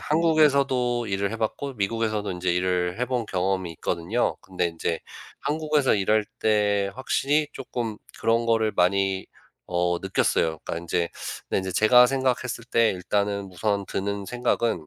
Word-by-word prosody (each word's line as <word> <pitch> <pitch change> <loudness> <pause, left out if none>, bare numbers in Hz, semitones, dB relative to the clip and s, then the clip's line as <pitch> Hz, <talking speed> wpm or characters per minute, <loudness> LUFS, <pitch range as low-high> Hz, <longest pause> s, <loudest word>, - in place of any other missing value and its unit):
한국에서도 140 -7 +2
일을 100 +2 -1
해 - - -3
봤고 125 +5 -3
미국에서도 110 0 -1
이제 90 0 0
일을 90 +2 0
해 125 - +3
본 120 -3 -1
경험이 95 -2 -1
있거든요. 90 +8 -1
근데 90 -2 -2
인제 85 0 -2 0.4
한국에서 150 -3 +1
일할 105 +2 +2
때 105 -2 +2
확실히 145 +3 +1
쪼끔 120 -5 -4 0.2
그런 115 +1 +2
거를 115 -2 +2
많이 95 +1 +1 0.4
어 90 0 0
느꼈어요. 80 -4 0
그러니까 - - -4
인제 85 0 -1 0.4
근데 - - +1
인제 95 -1 -3
제가 125 +6 +6
생각했을 130 -2 -1
때 115 -2 +3
일단은 100 +1 -1
우선 100 +1 -1
드는 100 +1 -3
생각은 115 -7 -1
105 Hz, 330 characters per minute, -25 LUFS, 95-125 Hz, 0.4 s, 제가